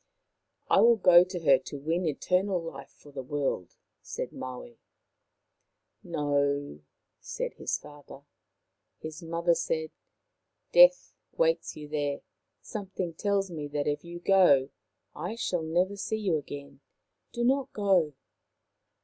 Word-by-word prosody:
" -, -, -54 dB, 0.2 s
I -, -, +4 dB
will 235 Hz, 0 st, +6 dB
go 180 Hz, -4 st, +7 dB
to 180 Hz, 0 st, -6 dB
her 135 Hz, -5 st, +5 dB
to 140 Hz, +2 st, -8 dB
win 165 Hz, +5 st, -1 dB
eternal 180 Hz, +5 st, 0 dB
life 165 Hz, -5 st, -8 dB
for 145 Hz, -, -18 dB
the 135 Hz, -1 st, -6 dB
world," 135 Hz, -, -3 dB, 0.3 s
said -, -, -6 dB
Maui. 125 Hz, -2 st, -8 dB, 0.7 s
" -, -, -53 dB
No," 145 Hz, -, -1 dB, 0.4 s
said -, -, -5 dB
his -, -, -2 dB
father. 145 Hz, -1 st, -13 dB, 0.7 s
His 155 Hz, -1 st, -8 dB
mother 170 Hz, +1 st, +1 dB
said: 160 Hz, -1 st, -2 dB, 0.4 s
" -, -, -53 dB
Death -, -, +6 dB, 0.2 s
waits -, -, +1 dB
for -, -, -11 dB
you 150 Hz, -, -8 dB
there. 145 Hz, -1 st, -2 dB, 0.4 s
Something 190 Hz, -5 st, -5 dB
tells 195 Hz, +1 st, -1 dB
me 150 Hz, -3 st, -5 dB
that 145 Hz, 0 st, -2 dB
if 145 Hz, 0 st, -1 dB
you 175 Hz, 0 st, -8 dB
go 175 Hz, -8 st, +4 dB, 0.5 s
I 225 Hz, -, -4 dB
shall 185 Hz, -7 st, -1 dB
never 175 Hz, +5 st, 0 dB
see 220 Hz, +2 st, -3 dB
you 195 Hz, -6 st, 0 dB
again. 140 Hz, -2 st, -7 dB, 0.5 s
Do 240 Hz, -, -3 dB
not 270 Hz, +2 st, +1 dB
go.' 185 Hz, -8 st, +2 dB
165 Hz, 140 wpm, -28 LUFS, 145-190 Hz, 0.7 s, go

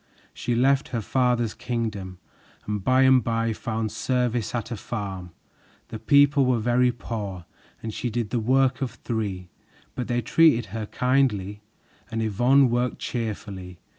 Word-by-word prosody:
She 120 Hz, -, -2 dB
left 135 Hz, +3 st, +3 dB
her 120 Hz, -, -3 dB
father's 120 Hz, -1 st, +1 dB
kingdom 110 Hz, -6 st, -4 dB, 0.5 s
and 105 Hz, -2 st, -3 dB
by 130 Hz, +4 st, +4 dB
and 130 Hz, -2 st, +5 dB
by 115 Hz, 0 st, 0 dB
found 110 Hz, -1 st, -3 dB
service 125 Hz, 0 st, -1 dB
at 115 Hz, 0 st, -4 dB
a -, -, -2 dB
farm. 95 Hz, -4 st, -5 dB, 0.6 s
The 110 Hz, -, -6 dB
people 140 Hz, +4 st, +4 dB
were 125 Hz, -1 st, +2 dB
very 120 Hz, +2 st, +2 dB
poor, 105 Hz, -7 st, -6 dB, 0.4 s
and 110 Hz, -1 st, -4 dB
she 120 Hz, -, -3 dB
did 115 Hz, -2 st, -3 dB
the 120 Hz, -, +1 dB
work 130 Hz, +3 st, +2 dB
of 130 Hz, -, 0 dB
three, 100 Hz, -6 st, -4 dB, 0.4 s
but 125 Hz, -, -4 dB
they 120 Hz, -1 st, -1 dB
treated 120 Hz, -, +3 dB
her 110 Hz, -2 st, -4 dB
kindly, 105 Hz, -7 st, 0 dB, 0.5 s
and 115 Hz, -1 st, -2 dB
Yvonne 125 Hz, +5 st, +4 dB
worked 120 Hz, +1 st, 0 dB
cheerfully. 100 Hz, -6 st, -5 dB
115 Hz, 150 wpm, -25 LUFS, 105-125 Hz, 0.6 s, and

